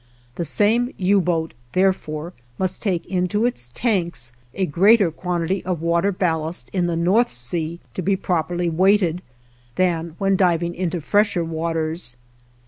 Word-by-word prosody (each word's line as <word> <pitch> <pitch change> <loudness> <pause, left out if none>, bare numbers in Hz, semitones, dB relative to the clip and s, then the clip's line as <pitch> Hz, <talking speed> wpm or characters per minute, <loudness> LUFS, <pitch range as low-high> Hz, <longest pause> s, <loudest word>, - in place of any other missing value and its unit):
The 170 - -3
same 225 - +2
U 195 +1 +3
boat, 165 -2 -1 0.2
therefore, 175 -3 0 0.2
must 185 -1 -1
take 185 -6 -1
into 185 +4 0
its 120 - -2
tanks 170 - -1 0.2
a 190 - +1
greater 190 +4 +4
quantity 180 +2 -2
of 180 -3 -2
water 170 +4 +2
ballast 165 -3 -2
in 180 -3 +1
the 170 - -1
North 185 +9 +2
Sea, 155 +7 -2
to - - -3
be 195 +2 +1
properly 175 -1 -1
weighted, 180 0 +2 0.5
than 170 -3 0
when 195 -1 +2
diving 175 -2 +2
into 175 -1 -2
fresher 205 0 +2
waters. 160 -3 -3
175 Hz, 140 wpm, -22 LUFS, 165-195 Hz, 0.5 s, greater